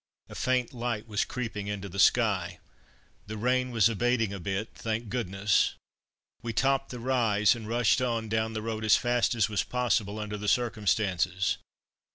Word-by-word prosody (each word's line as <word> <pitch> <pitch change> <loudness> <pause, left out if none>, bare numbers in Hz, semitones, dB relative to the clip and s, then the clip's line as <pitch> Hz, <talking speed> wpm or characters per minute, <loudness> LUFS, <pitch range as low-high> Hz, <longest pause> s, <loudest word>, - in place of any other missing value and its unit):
A - - -10
faint 130 -1 0
light 120 -3 -3
was 105 -2 0
creeping 115 -5 -5
into 100 -1 -4
the 100 +1 -7
sky. 100 -6 +3 0.7
The 110 +1 -5
rain 125 +3 +1
was 115 -3 +4
abating 115 -1 0
a 100 - -5
bit, 95 +5 -3
thank 110 0 -4
goodness! 100 -3 +1 0.7
We 115 -1 -4
topped 135 +3 +1
the 125 - -6
rise, 115 -4 +3
and 115 -3 -7
rushed 120 +2 +2
on 115 -3 -1
down 110 +1 -1
the 110 -1 -4
road 110 -1 -3
as 110 - +6
fast 120 0 +1
as 110 -3 +2
was 105 -2 0
possible 115 -4 0
under 105 -1 -4
the 105 0 -5
circumstances. 100 -5 +1
110 Hz, 170 wpm, -28 LUFS, 105-120 Hz, 0.7 s, as